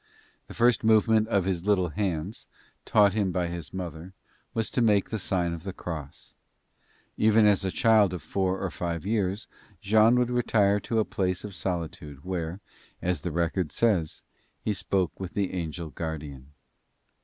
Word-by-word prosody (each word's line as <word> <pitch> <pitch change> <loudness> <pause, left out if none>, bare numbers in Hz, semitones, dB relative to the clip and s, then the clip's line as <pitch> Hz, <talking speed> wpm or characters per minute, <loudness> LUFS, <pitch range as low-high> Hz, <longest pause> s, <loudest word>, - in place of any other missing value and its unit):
The - - -11
first 120 0 +3
movement 110 0 +4
of 100 -5 +1
his 95 -1 -2
little 95 -4 +3
hands, 95 +1 -3 0.4
taught 100 -2 +4
him 100 -3 0
by 90 -1 -1
his 85 -3 -6
mother, 90 -1 -6 0.4
was 110 -3 -2
to - - 0
make 105 -4 +3
the 110 - -2
sign 90 -2 0
of 85 - -6
the 95 - -5
cross. 80 -6 -8 0.8
Even 110 0 +5
as 105 -2 +4
a 95 - 0
child 110 -2 +4
of 90 -5 -6
four 95 +3 -1
or 95 - -2
five 85 -1 -4
years 105 0 -1 0.3
Jean 110 +4 +4
would 125 0 +1
retire 105 -4 +2
to 115 +3 -3
a 110 - +3
place 90 -2 -2
of 105 -2 -7
solitude 80 -6 -4
where, 90 -1 -3 0.4
as 90 -4 -1
the 90 - -3
record 85 0 -1
says, 95 -9 0 0.4
"he 105 - -1
spoke 95 -1 -1
with 95 -1 -6
the 100 -2 -1
angel 85 -2 -4
guardian." 75 -3 -6
95 Hz, 165 wpm, -27 LUFS, 85-105 Hz, 0.8 s, Even